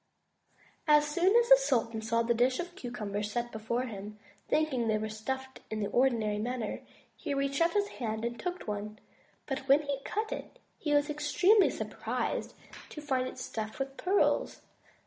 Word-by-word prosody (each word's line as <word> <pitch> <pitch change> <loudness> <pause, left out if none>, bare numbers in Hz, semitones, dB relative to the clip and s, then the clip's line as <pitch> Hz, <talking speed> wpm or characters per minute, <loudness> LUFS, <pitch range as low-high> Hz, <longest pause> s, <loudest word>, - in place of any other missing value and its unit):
As 300 0 +6
soon 350 +7 +2
as 475 0 +5
the - - +10
sultan 230 - 0
saw 230 +1 +1
the 235 +1 +2
dish 250 +2 +2
of 350 0 -4
cucumbers 210 - -4
set 240 +1 -2
before 220 +3 -2
him, 210 -3 -7 0.3
thinking 275 -7 +1
they 215 -1 +2
were 215 0 -3
stuffed 265 +5 -5
in 220 - -3
the 205 - -1
ordinary 230 -5 +2
manner, 240 0 -3 0.3
he 285 - -3
reached 275 +2 0
out 335 0 +3
his 410 -1 +2
hand 220 -2 -3
and 235 0 -3
took 360 0 -4
one; 210 0 -4 0.5
but 270 -1 -2
when 280 +3 +5
he 280 -1 -2
cut 430 +6 -2
it, - - -6 0.2
he 300 - -2
was 290 0 +3
extremely 355 +8 +4
surprised - - -3 0.3
to - - -8
find 265 -4 0
it - - -8
stuffed 220 -1 -5
with 270 0 -4
pearls. 380 +6 +1
255 Hz, 175 wpm, -31 LUFS, 220-300 Hz, 0.5 s, the